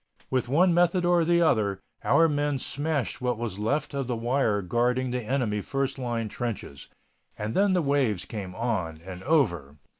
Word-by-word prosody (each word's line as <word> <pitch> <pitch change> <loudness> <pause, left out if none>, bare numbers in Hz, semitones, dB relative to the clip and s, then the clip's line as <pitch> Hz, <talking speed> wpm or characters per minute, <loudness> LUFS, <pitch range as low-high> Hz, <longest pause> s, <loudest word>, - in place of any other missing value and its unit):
With 130 -2 0
one 175 +6 +4
method 175 +1 +3
or 175 -1 +4
the 170 +1 +3
other 105 - +2 0.2
our 165 - +5
men 145 -2 0
smashed 145 -1 -2
what 125 -2 0
was 110 -4 -4
left 140 +8 -1
of 135 -2 -2
the 125 - -1
wire 115 -3 +1
guarding 125 +5 0
the 125 0 -1
enemy 110 -3 -1
first 135 +3 -2
line 120 -3 -2
trenches. 105 - -5 0.5
And 105 +1 -3
then 200 0 +3
the 180 -2 +2
waves 135 -9 +1
came 95 -4 -6
on 95 -9 -2
and 90 -1 -8
over. 85 - +1
125 Hz, 175 wpm, -27 LUFS, 105-145 Hz, 0.5 s, our